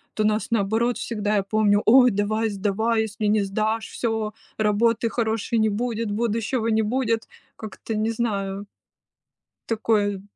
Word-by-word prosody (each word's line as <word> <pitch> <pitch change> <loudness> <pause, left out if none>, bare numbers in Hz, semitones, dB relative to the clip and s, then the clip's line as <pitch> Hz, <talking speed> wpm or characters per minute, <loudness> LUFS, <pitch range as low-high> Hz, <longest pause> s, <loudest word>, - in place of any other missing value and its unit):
то 215 - 0
нас, 215 +1 +1
наоборот, 225 +3 +1
всегда, 210 -2 -2
я 200 - +1
помню: 205 0 +2
"Ой, 250 +1 +7
давай 215 +2 0
сдавай, 215 +3 0
если 215 0 -4
не 210 0 +3
сдашь, 215 +3 -1
всё, 220 -2 -2 0.2
работы 220 +2 +2
хорошей 225 -1 -1
не 220 0 +3
будет, 225 0 -2
будущего 230 +2 -1
не 220 -1 +2
будет". 230 0 -1 0.3
Как-то, 220 +1 -7
не 215 +1 0
знаю 200 -4 -2 1.0
такое. 210 -3 0
220 Hz, 140 wpm, -23 LUFS, 205-230 Hz, 1.0 s, Ой